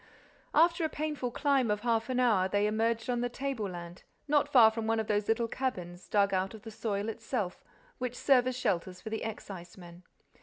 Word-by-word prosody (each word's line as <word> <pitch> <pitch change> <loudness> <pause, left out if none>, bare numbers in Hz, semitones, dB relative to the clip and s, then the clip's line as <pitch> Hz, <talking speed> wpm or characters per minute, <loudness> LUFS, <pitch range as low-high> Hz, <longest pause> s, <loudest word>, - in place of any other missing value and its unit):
After 335 +2 +4
a 315 - +1
painful 300 -5 -3
climb 270 -1 +1
of 210 0 0
half 230 0 0
an 255 -1 0
hour, 215 -7 +3
they 205 +1 +2
emerged 225 +1 0
on 245 -1 0
the 245 - 0
tableland, 200 -10 -5 0.3
not 290 0 +3
far 230 -5 +8
from 220 0 -4
one 225 0 +2
of 220 - -1
those 205 -1 0
little 225 +1 +1
cabins, 180 -9 -4
dug 200 -1 +3
out 190 +3 0
of 215 - -13
the 225 - -8
soil 210 -1 -2
itself, 225 -4 -3 0.4
which 250 -1 -3
serve 255 -3 +4
as 255 -1 -2
shelters 180 -5 -1
for 220 - -8
the 220 - -2
excisemen. 180 -5 -8
225 Hz, 195 wpm, -31 LUFS, 200-250 Hz, 0.4 s, far